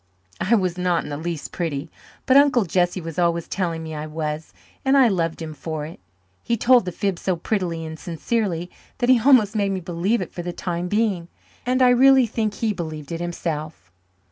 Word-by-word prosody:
I 225 +5 +3
was 185 -4 0
not 180 -2 +1
in - - -7
the - - -2
least 165 -1 -5
pretty 160 -3 -3 0.3
but 260 - +4
Uncle 275 -6 +5
Jesse 175 +1 +1
was 165 0 -5
always 170 -1 +1
telling 170 -4 -2
me 160 0 -6
I 155 0 -5
was 155 0 -4 0.3
and 270 +1 +4
I 265 -3 +7
loved 165 -5 -1
him 155 -1 -6
for 155 0 -5
it. 160 - -10 0.4
He 235 - -1
told 245 -1 +5
the 180 - -3
fib 195 -1 -2
so 185 - 0
prettily 170 -2 -2
and 160 0 -7
sincerely 175 0 -2 0.3
that 245 -1 0
he 255 -2 +6
almost 230 -4 +5
made 200 -2 +1
me 190 - -2
believe 180 +6 -1
it 185 - -5
for 175 - -6
the 175 +1 -4
time 175 0 -3
being, 205 -4 0 0.4
and 255 +1 +3
I 250 - +6
really 265 +1 +6
think 215 -2 -2
he 220 0 0
believed 155 -5 -6
it 165 0 -4
himself. 160 - -4
175 Hz, 205 wpm, -23 LUFS, 165-220 Hz, 0.4 s, I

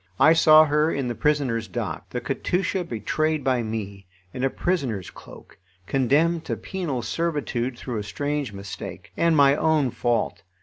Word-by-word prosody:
I 160 - +7
saw 155 -1 +7
her 150 +2 +2
in 135 -3 -2
the - - -1
prisoners' 130 -6 0
dock, - - -5
the - - -3
Katusha 185 +1 -1
betrayed 155 +3 -1
by 130 -2 +1
me, 100 -4 -5 0.3
in 125 - -4
a 135 - +3
prisoner's 130 - -2
cloak, - - -14 0.3
condemned 150 - +2
to - - -3
penal 155 -11 -4
servitude 130 -3 -2
through 120 -3 -4
a - - -4
strange 145 +4 -3
mistake, 100 -2 -8
and 170 -2 +2
my 140 0 +6
own 150 -4 +2
fault. 120 0 -1
140 Hz, 160 wpm, -24 LUFS, 120-155 Hz, 0.3 s, I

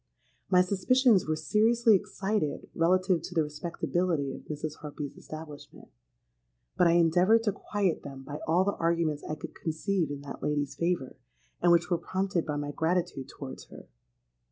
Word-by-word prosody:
My 180 -1 +6
suspicions 205 - +3
were 155 - +1
seriously 225 +6 +3
excited 195 -4 -1
relative 185 +1 +2
to 180 - -8
the 160 - +4
respectability 155 -1 -2
of - - -8
Mrs. 150 0 -5
Harpy's 145 -2 -7
establishment; 155 -2 -10 0.9
but 180 - +4
I 170 - +4
endeavoured 180 +7 +4
to 210 - +2
quiet 200 -2 -1
them 135 -1 -9
by 145 +2 -6
all 170 +4 +4
the 200 +1 0
arguments 165 -3 0
I 155 - -4
could 155 +1 -8
conceive 165 +1 -1
in 145 -1 -5
that 140 -1 -8
lady's 145 -2 -1
favour, 170 -4 -2 0.4
and 175 - +5
which 170 +2 +3
were 175 - +2
prompted 190 -2 -1
by 150 - -1
my 145 0 -3
gratitude 160 -4 -1
towards 135 -2 -8
her. - - -14
165 Hz, 160 wpm, -29 LUFS, 150-185 Hz, 0.9 s, My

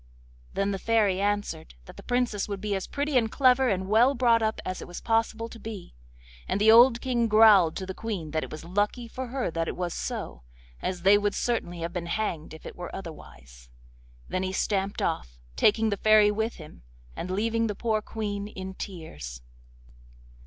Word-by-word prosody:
Then 195 0 0
the 195 - -3
Fairy 205 -3 +2
answered 205 - -2
that - - -12
the - - -11
Princess 245 -5 -1
would 200 -2 -4
be 210 +1 -2
as 195 -1 -3
pretty, 285 -1 -1
and 225 -1 -2
clever, 260 -1 +4
and 190 -2 -1
well 235 +7 +4
brought 235 -2 +3
up 220 0 0
as 185 - -4
it - - -8
was 175 - -7
possible 225 0 0
to 230 - -11
be, 210 -4 -8 0.5
and - - -1
the 215 +1 +6
old 235 +1 +7
King 240 -3 +1
growled 210 -6 +6
to 190 - -4
the 190 - -5
Queen 185 -8 -5
that 155 0 -1
it - - -7
was 155 +1 -8
lucky 205 +6 -1
for 255 +2 -6
her 250 -6 -2
that 165 0 -2
it - - -3
was 180 -1 -2
so, - - -5 0.4
as 180 -2 -3
they 200 +2 +6
would 205 0 -1
certainly 175 -8 -2
have 170 +1 -4
been 175 -2 -4
hanged 170 -5 -3
if 160 - -15
it - - -8
were 175 0 -7
otherwise. 65 - -11 0.6
Then 185 - -2
he 185 0 -2
stamped 195 0 -1
off, - - -2 0.2
taking 220 - +3
the 200 - -1
Fairy 215 0 +5
with 220 +2 -2
him, 155 - -13 0.3
and 180 - -5
leaving 225 +4 0
the 210 - -3
poor 220 -1 0
Queen 205 -2 -4
in 190 -2 -7
tears. 75 - -8
205 Hz, 200 wpm, -27 LUFS, 180-225 Hz, 0.6 s, old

